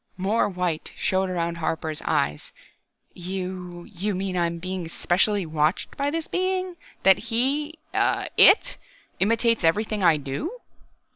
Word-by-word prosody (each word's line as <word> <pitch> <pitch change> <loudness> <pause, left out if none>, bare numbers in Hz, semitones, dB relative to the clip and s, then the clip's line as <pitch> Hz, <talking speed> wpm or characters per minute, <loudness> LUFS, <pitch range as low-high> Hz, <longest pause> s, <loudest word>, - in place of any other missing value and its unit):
More 200 +4 +1
white 180 -4 -2
showed 190 0 0
around 170 -2 -2
Harper's 160 -1 -2
eyes. 75 +1 -1 0.6
"You 180 -1 -6
you 200 +3 -4
mean 190 0 -3
I 175 -1 +2
am 170 0 -4
being 185 0 -5
specially 190 +4 +1
watched 155 +2 -1
by 280 +1 0
this 325 +1 -2
Being 370 0 -1 0.3
that 190 0 +6
He 285 +7 0 0.2
It 460 +5 +4 0.4
imitates 230 +1 +2
everything 210 +5 +1
I 165 -3 +5
do...?" 150 - -5
185 Hz, 130 wpm, -24 LUFS, 170-230 Hz, 0.6 s, that